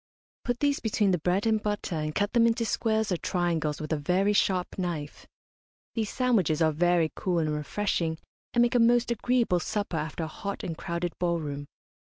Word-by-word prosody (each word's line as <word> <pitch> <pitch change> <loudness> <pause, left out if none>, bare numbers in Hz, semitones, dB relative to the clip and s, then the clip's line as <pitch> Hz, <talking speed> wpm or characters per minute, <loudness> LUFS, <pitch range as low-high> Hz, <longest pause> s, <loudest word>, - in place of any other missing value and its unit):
Put 245 -1 -1
these 285 -1 +2
between 210 -3 +1
the 180 - +1
bread 180 +6 +1
and 220 -1 +2
butter, 205 -3 -2
and 155 -1 -3
cut 205 0 0
them 235 -1 +5
into 230 0 +1
squares 220 -1 0
or 180 - +1
triangles 165 -4 -1
with 155 +1 -3
a - - +1
very 185 +7 +2
sharp 185 -2 +1
knife. 165 -5 -4 0.7
These 220 -3 -1
sandwiches 215 - +2
are 160 -1 +4
very 170 0 +2
cool 180 -2 -1
and 155 -2 +1
refreshing, 160 +1 -1 0.4
and 240 - +6
make 240 - +2
a 245 - +4
most 240 +1 +4
agreeable 235 -5 +2
supper 205 -1 -2
after 160 +2 -3
a - - -2
hot 200 +5 -5
and 165 - -3
crowded 170 +1 -3
ball 170 -1 +1
room. 145 -2 -5
180 Hz, 190 wpm, -28 LUFS, 160-220 Hz, 0.7 s, and